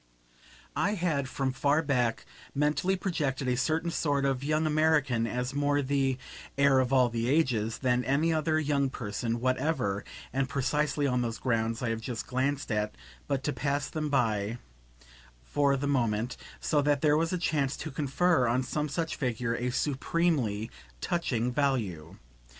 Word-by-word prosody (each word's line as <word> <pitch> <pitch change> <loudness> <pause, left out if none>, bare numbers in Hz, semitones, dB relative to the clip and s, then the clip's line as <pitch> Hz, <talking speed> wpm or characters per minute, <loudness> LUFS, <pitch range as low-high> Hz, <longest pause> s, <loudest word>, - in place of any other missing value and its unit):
I 205 +3 +1
had 155 -7 0
from 135 -1 -1
far 140 +4 +2
back 125 -5 0 0.3
mentally 150 +6 +2
projected 145 -9 -2
a 125 - +2
certain 160 +6 0
sort 145 -4 0
of 135 -1 0
young 155 +2 +1
American 150 -6 +2
as 125 +3 -2
more 145 0 +1
the 135 -1 +1 0.4
"heir 140 -1 +5
of 130 0 +1
all 130 -2 +5
the 115 0 -1
ages" 125 -7 +1
than 125 -1 +1
any 150 +6 +2
other 155 0 +1
young 140 -3 +1
person 115 0 -3
whatever 130 -5 0 0.3
(and 135 0 0
precisely 145 +2 0
on 125 -2 +1
those 115 -1 -2
grounds 115 -1 -1
I 120 - 0
have 115 0 -2
just 115 0 -4
glanced 135 +1 -1
at 105 0 -1 0.3
but 135 -1 -1
to 150 - -1
pass 140 0 -1
them 155 -1 -2
by 110 -4 +1 0.9
for 140 - +2
the 140 - -2
moment); 120 -4 0 0.2
so 150 -2 +1
that 145 0 +1
here 150 -1 +5
was 165 +2 +1
a 180 - 0
chance 150 -5 0
to 155 - -5
confer 145 +1 +2
on 125 +3 +1
some 150 +4 -2
such 160 +3 -2
figure 125 -3 -1
a 120 +1 -1
supremely 135 -5 0 0.3
touching 125 - -1
value. 115 - -1
135 Hz, 160 wpm, -29 LUFS, 120-150 Hz, 0.9 s, heir